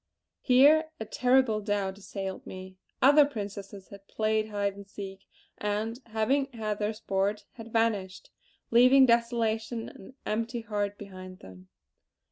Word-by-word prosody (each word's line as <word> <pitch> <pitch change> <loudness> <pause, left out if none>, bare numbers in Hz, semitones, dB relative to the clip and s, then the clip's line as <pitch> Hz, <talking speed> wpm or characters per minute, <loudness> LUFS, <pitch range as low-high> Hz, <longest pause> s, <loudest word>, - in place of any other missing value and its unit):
Here 295 +5 +5
a 220 - -4
terrible 250 -2 +2
doubt 200 -2 -2
assailed 195 -1 -6
me. 185 0 -9 0.3
Other 290 +3 +8
Princesses 200 -6 -6
had 200 0 -13
played 215 0 0
hide 200 -1 -1
and 200 0 -12
seek; 195 -1 -9 0.3
and, 215 +3 -2
having 230 +6 +1
had 215 -2 -3
their 210 +1 -1
sport, 200 -1 -1
had 225 -2 -11
vanished; 215 -5 -1 0.4
leaving 255 +3 +7
desolation 235 -1 0
and - - -15
an 195 +7 -13
empty 230 +2 -2
heart 205 -2 -3
behind 185 -2 -10
them. 95 0 -13
215 Hz, 135 wpm, -28 LUFS, 200-235 Hz, 0.4 s, Other